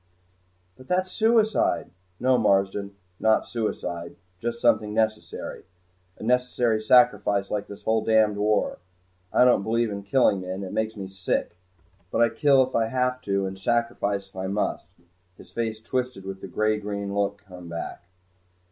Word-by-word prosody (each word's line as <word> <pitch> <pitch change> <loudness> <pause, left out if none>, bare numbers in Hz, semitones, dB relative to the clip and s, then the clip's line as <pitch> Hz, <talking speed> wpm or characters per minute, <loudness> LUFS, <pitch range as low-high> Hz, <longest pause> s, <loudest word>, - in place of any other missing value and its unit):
"But 130 - -15
that's 185 +1 0
suicide!" 220 0 +2 0.3
"No, 130 +1 +3
Marsden, 100 -1 +1 0.2
not 110 0 +3
suicide 90 -7 -4 0.2
just 120 +2 -3
something 105 -3 +2
necessary. 110 -1 -2 0.5
A - - -10
necessary 125 -2 +1
sacrifice, 105 -4 +3
like 105 -1 -2
this 100 - -11
whole 110 0 +1
damned 110 -2 +3
war! 105 0 +1 0.5
I 125 - +5
don't 125 -5 +5
believe 115 +1 0
in 100 0 -4
killing 100 -2 +2
men. 95 +1 -5
It 95 - -6
makes 110 0 -1
me 100 -2 -6
sick. 95 -2 -2 0.5
But - - +2
I 115 - +4
kill 140 0 +4
if 130 - -6
I 115 -1 +2
have 125 +1 0
to, 100 -1 0
and 95 0 -6
sacrifice 100 -3 0
if 95 - -28
I 95 0 -3
must." 100 +2 -2 0.5
His - - -15
face 110 -2 -2
twisted 125 -3 -3
and 95 0 -6
the - - -6
gray 110 +3 0
green 100 -1 -4
look 100 0 -1
came 90 -2 -10
back. 85 0 -6
110 Hz, 160 wpm, -25 LUFS, 100-120 Hz, 0.5 s, I